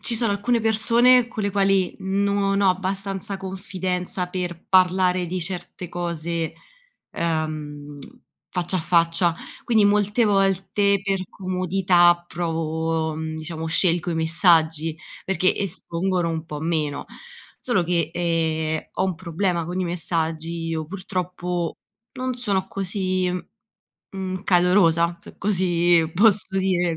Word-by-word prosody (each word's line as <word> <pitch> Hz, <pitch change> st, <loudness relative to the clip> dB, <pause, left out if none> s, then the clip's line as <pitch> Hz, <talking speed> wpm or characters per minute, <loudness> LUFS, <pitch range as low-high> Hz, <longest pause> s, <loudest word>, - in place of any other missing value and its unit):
ci 235 Hz, -, 0 dB
sono 225 Hz, -2 st, +2 dB
alcune 230 Hz, +4 st, 0 dB
persone 235 Hz, +3 st, +4 dB
con 220 Hz, -2 st, -5 dB
le 200 Hz, -, 0 dB
quali 195 Hz, -2 st, +1 dB
non 200 Hz, +1 st, 0 dB
ho 195 Hz, -, +4 dB
abbastanza 195 Hz, +1 st, -3 dB
confidenza 185 Hz, -1 st, -4 dB
per 180 Hz, -2 st, -5 dB
parlare 185 Hz, -1 st, +3 dB
di 180 Hz, +2 st, -3 dB
certe 180 Hz, 0 st, -6 dB
cose, 170 Hz, -2 st, -3 dB, 0.6 s
uhm, 155 Hz, -3 st, -3 dB, 0.5 s
faccia 180 Hz, +1 st, -1 dB
a -, -, -2 dB
faccia, 170 Hz, 0 st, +3 dB, 0.3 s
quindi 220 Hz, -3 st, +3 dB
molte 210 Hz, +3 st, +2 dB
volte 195 Hz, 0 st, +2 dB
per 195 Hz, -1 st, 0 dB
comodità 180 Hz, -2 st, +2 dB
provo 160 Hz, -1 st, -2 dB
mhmm, 160 Hz, 0 st, -4 dB
diciamo, 160 Hz, 0 st, -5 dB
scelgo 170 Hz, +1 st, +2 dB
i -, -, -1 dB
messaggi 160 Hz, -1 st, +3 dB, 0.3 s
perché 185 Hz, -1 st, +2 dB
espongono 180 Hz, -2 st, -1 dB
un 160 Hz, 0 st, -4 dB
po’ 150 Hz, -2 st, -6 dB
meno. 155 Hz, -3 st, -1 dB, 0.6 s
Solo 240 Hz, -8 st, +1 dB
che, 170 Hz, -2 st, 0 dB
ehm, 160 Hz, -2 st, 0 dB
ho 185 Hz, -, 0 dB
un 190 Hz, -1 st, -1 dB
problema 175 Hz, 0 st, -1 dB
con 175 Hz, +3 st, -4 dB
i -, -, 0 dB
messaggi, 165 Hz, -1 st, -2 dB
io 160 Hz, -1 st, -3 dB
purtroppo 180 Hz, -1 st, -3 dB, 0.4 s
non 255 Hz, -1 st, -3 dB
sono 205 Hz, -6 st, 0 dB
così, 185 Hz, -1 st, -1 dB, 0.8 s
mhmm, 190 Hz, -1 st, -5 dB
calorosa, 175 Hz, -2 st, +3 dB
se -, -, -14 dB
così 175 Hz, -4 st, +2 dB
posso 200 Hz, 0 st, +3 dB
dire, 180 Hz, -3 st, +1 dB
180 Hz, 125 wpm, -23 LUFS, 165-195 Hz, 0.8 s, persone